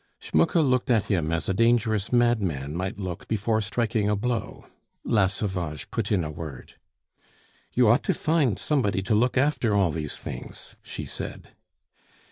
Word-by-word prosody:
Schmucke 80 - +1
looked 130 -7 +2
at 115 -4 +4
him 85 -6 0
as 85 0 -1
a 95 - +1
dangerous 115 -1 +2
madman 100 - +1
might 95 +2 -3
look 90 -4 -5
before 110 +1 0
striking 110 0 0
a 105 - +2
blow. 110 0 -3 0.4
La 105 -4 +3
Sauvage 90 -7 -4
put 110 -2 -2
in 95 -5 +2
a 75 - -4
word. 75 -4 -8 1.0
"You 125 -2 +4
ought 115 +3 +5
to - - +2
find 150 - +1
somebody 105 -11 0
to 95 - 0
look 120 +5 +2
after 130 -6 +2
all 95 -5 +3
these 75 -2 -4
things," - - -8
she - - -6
said. - - -7
105 Hz, 160 wpm, -26 LUFS, 90-120 Hz, 1.0 s, ought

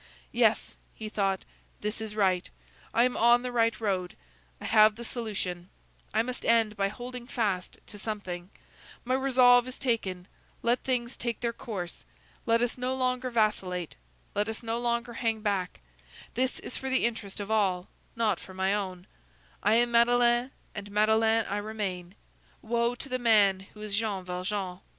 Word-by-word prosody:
"Yes," - - +2 0.2
he 215 -1 -6
thought, 195 -3 0 0.4
"this 210 +2 -3
is 215 -1 -5
right; 185 -4 +2 0.4
I 235 - +4
am 250 0 +1
on 240 +1 +5
the 250 - -3
right 230 -1 +2
road; 190 -5 -1 0.4
I - - -8
have 215 -1 +6
the 235 +1 -7
solution; 190 -7 -4 0.4
I 220 +1 +2
must 250 +1 -5
end 225 -2 +3
by 195 -1 +1
holding 245 +3 -7
fast 205 -8 -1
to 205 - -8
something; 185 -4 -5 0.6
my 255 - 0
resolve 255 -2 +5
is 255 - -7
taken; 190 -8 -1 0.4
let 240 +2 +2
things 245 -1 -1
take 235 -2 -3
their 235 -1 0
course; 190 -7 -6 0.4
let 230 +1 +4
us 245 +1 -1
no 255 +1 -1
longer 255 0 0
vacillate; 195 -7 0 0.4
let 210 +2 0
us 220 +2 -5
no 230 +1 -1
longer 235 0 -1
hang 225 -2 -1
back; 195 - -1 0.5
this 255 +2 0
is - - -5
for 265 - -4
the 260 -2 +2
interest 220 -4 -3
of 205 +1 -4
all, 190 -5 +2 0.3
not 230 -2 +1
for 190 - -12
my 190 +1 +1
own; 185 -3 -3 0.6
I 210 +2 +4
am 240 +1 +3
Madeleine, 240 +1 +4 0.2
and 205 -1 -7
Madeleine 220 +2 +3
I 205 - -2
remain. 200 -4 -4 0.5
Woe 235 +1 +1
to 265 - -5
the 255 -1 -2
man 200 -5 +4
who 210 - -11
is 210 -1 -2
Jean 205 -3 -1
Valjean! 185 0 -3
220 Hz, 170 wpm, -29 LUFS, 195-240 Hz, 0.6 s, have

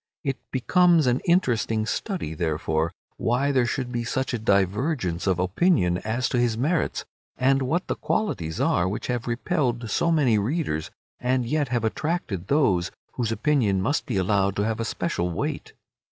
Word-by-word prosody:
It 135 -3 -2
becomes 170 +4 +3
an 125 +1 +2
interesting 115 -10 +2
study, 175 - -3
therefore, 80 0 -1 0.3
why 130 +5 +1
there 130 -3 +2
should 125 0 -2
be 120 -1 -2
such 130 +2 -2
a 120 - -1
divergence 100 - 0
of 95 -2 +2
opinion 90 - +2
as 120 +5 -1
to 125 - 0
his 120 -2 +1
merits, 155 +7 0 0.3
and 135 +1 +3
what 160 +8 0
the - - -1
qualities 85 - -2
are 90 +1 +2
which 105 - -4
have 125 -2 -2
repelled 120 -1 -1
so 170 - +2
many 135 -9 +3
readers, 110 - -1 0.3
and 125 0 +1
yet 145 +3 0
have 120 -2 -1
attracted 110 - -2
those 100 - +2 0.2
whose 115 -3 -1
opinion 115 -6 +2
must 140 +12 0
be 115 - -1
allowed 100 0 +1
to 100 - 0
have 110 0 -1
a 115 - -1
special 90 - -2
weight. 85 - -4
120 Hz, 165 wpm, -25 LUFS, 100-140 Hz, 0.3 s, becomes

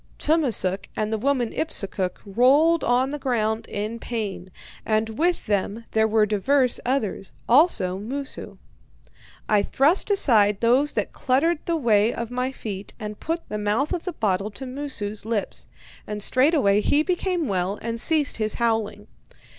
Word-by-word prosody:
Tummasook 245 - +1
and 215 +1 -2
the - - +1
woman 250 -2 0
Ipsukuk 195 - -1
rolled 275 +11 +4
on 255 +2 +2
the 295 - -4
ground 225 -4 -1
in 215 +3 -4
pain, 205 -7 -5 0.3
and 220 0 0
with 340 +10 0
them 205 +2 -2
there 220 0 +3
were 220 -1 +3
divers 250 +5 +1
others, 235 -7 -2
also 230 - +3
Moosu. 270 +6 -6 0.9
I 210 -1 +3
thrust 295 - +2
aside 215 - +3
those 250 +6 +3
that - - -2
cluttered 295 +6 +1
the 335 -1 +1
way 220 -5 +3
of 235 0 -5
my 250 +1 -1
feet, 200 -6 -7
and 210 -2 -6
put 330 +1 -3
the 210 - -4
mouth 210 - 0
of 350 - -4
the 365 - -3
bottle 200 -5 -1
to 235 +6 -8
Moosu's 250 -6 -4
lips. 220 -2 -3 0.4
And 210 -1 -3
straightway 255 -7 +3
he 290 +7 +2
became 360 -2 -1
well 190 0 -1
and 230 0 -3
ceased 305 +1 +1
his 215 -1 -1
howling. 225 -3 -1
230 Hz, 155 wpm, -24 LUFS, 210-280 Hz, 0.9 s, rolled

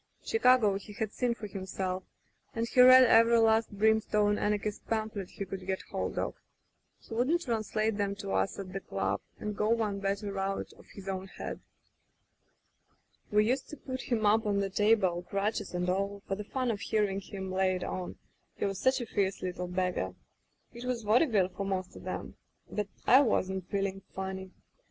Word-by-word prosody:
Chicago 250 - +4
he 205 +1 -11
had 215 0 -3
seen 245 -2 0
for 220 - -7
himself, 190 -1 -3 0.5
and 230 0 -1
he 250 - +5
read 255 +1 +10
every 230 -1 +6
last 225 0 +4
brim 220 +2 +3
stone 210 -1 +1
anarchist 210 0 -1
pamphlet 215 -4 -2
he 200 - -6
could 190 0 -6
get 190 0 -2
hold - - -3
of. - - -1 0.6
He - - -12
would 260 +9 +2
translate 220 - -1
'em 200 -1 0
to 200 -1 -6
us - - 0
at 190 -1 -7
the 195 - -2
club - - -2 0.2
and 210 -1 -4
go 210 +1 0
one 220 -3 +1
better 200 0 -2
out 195 0 -2
of - - -18
his 195 -1 -10
own 190 0 -3
head. - - -6 1.7
"We 210 0 +4
used 260 +4 0
to 300 - -8
put 260 -1 -5
him 225 -3 +1
up 215 +1 +4
on 200 -1 +1
the 195 -1 -1
table, 195 -4 +3
crutches 200 +2 -2
and 180 0 -1
all, 200 +2 -1
for - - -1
the 205 +1 -4
fun 255 +1 -1
of 210 - -3
hearing 205 -3 0
him 190 -1 -6
lay 185 0 +2
it 180 - -4
on 180 -1 -4 0.2
— - - -44
he - - -1
was 195 -1 -2
such 260 0 +2
a - - -3
fierce 195 -4 -1
little 180 -1 -3
beggar. 180 - -1 0.6
It 235 - -8
was 250 -2 -2
vaudeville 215 - +3
for 200 - -5
most 190 -2 -3
of - - -10
*em. - - -5 0.3
But 210 -1 -2 0.2
I 260 +3 +8
wasn't 190 -7 0
feeling 195 -1 -1
funny. 190 0 -4
205 Hz, 190 wpm, -30 LUFS, 190-225 Hz, 1.7 s, read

